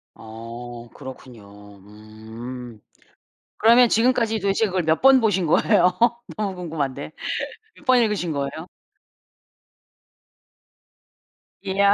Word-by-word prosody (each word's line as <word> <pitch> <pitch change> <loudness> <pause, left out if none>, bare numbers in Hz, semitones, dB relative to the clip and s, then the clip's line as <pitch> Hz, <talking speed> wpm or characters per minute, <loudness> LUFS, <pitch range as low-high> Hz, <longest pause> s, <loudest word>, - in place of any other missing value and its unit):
어 115 +2 -9
그렇군요. 105 -7 -12
음. 110 +4 -10 0.8
그러면 235 +2 +6
지금까지 225 -1 +2
도대체 200 +2 +1
그걸 185 -3 -1
몇 160 0 +1
번 270 0 +7
보신 195 -6 +1
거예요? 180 +2 +3 0.4
너무 200 -3 -2
궁금한데. 155 -6 -4 0.7
몇 - - -18
번 255 -1 +5
읽으신 210 -7 0
거예요? 140 +3 -4 3.0
이야. 200 +1 +3
160 Hz, 205 characters per minute, -23 LUFS, -, 3.0 s, 번